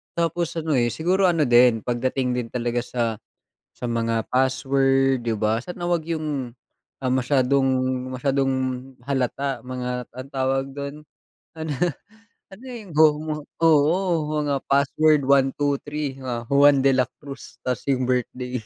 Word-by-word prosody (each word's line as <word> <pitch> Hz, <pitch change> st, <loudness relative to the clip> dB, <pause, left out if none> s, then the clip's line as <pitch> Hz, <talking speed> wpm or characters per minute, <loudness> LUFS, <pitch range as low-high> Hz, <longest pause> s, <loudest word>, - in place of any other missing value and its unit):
Tapos 170 Hz, 0 st, -1 dB
ano, 160 Hz, -1 st, -2 dB
eh, 120 Hz, -3 st, +3 dB
siguro 185 Hz, +7 st, +1 dB
ano 165 Hz, -3 st, +2 dB
din 120 Hz, -3 st, +5 dB
pagdating 125 Hz, +1 st, -1 dB
din 125 Hz, -1 st, -2 dB
talaga 120 Hz, 0 st, -1 dB
sa 115 Hz, -2 st, -2 dB, 0.6 s
sa 125 Hz, -, -6 dB
mga 115 Hz, -1 st, 0 dB
password 135 Hz, 0 st, +2 dB
di 115 Hz, -1 st, -1 dB
ba, 110 Hz, +2 st, +1 dB
sana 175 Hz, +4 st, -6 dB
huwag 170 Hz, -2 st, 0 dB
'yung, 150 Hz, -7 st, -3 dB, 0.5 s
ah, -, -, +2 dB
masyadong 135 Hz, +1 st, +2 dB, 0.4 s
masyadong 135 Hz, +1 st, 0 dB, 0.5 s
halata, 135 Hz, -1 st, -1 dB
mga 125 Hz, 0 st, -5 dB
ano 130 Hz, +2 st, -9 dB
tawag 135 Hz, 0 st, 0 dB
do'n, 140 Hz, 0 st, -5 dB, 0.6 s
ano, 160 Hz, -1 st, -4 dB, 0.8 s
ano 215 Hz, +7 st, -13 dB
'yung 225 Hz, -8 st, -9 dB
go 155 Hz, 0 st, +8 dB
mo, 155 Hz, 0 st, -3 dB, 0.3 s
oo, 155 Hz, +1 st, +5 dB, 0.4 s
mga 145 Hz, -1 st, 0 dB
password 145 Hz, +2 st, +3 dB
123, 140 Hz, +1 st, 0 dB
mga 125 Hz, -3 st, -5 dB
Juan 140 Hz, 0 st, +5 dB
de 135 Hz, -, +5 dB
la 130 Hz, -, +4 dB, 0.2 s
Cruz 140 Hz, -2 st, -10 dB
tas 125 Hz, -1 st, -1 dB
'yung 130 Hz, -2 st, +1 dB
birthday. 125 Hz, 0 st, -2 dB
135 Hz, 140 wpm, -23 LUFS, 125-150 Hz, 0.8 s, go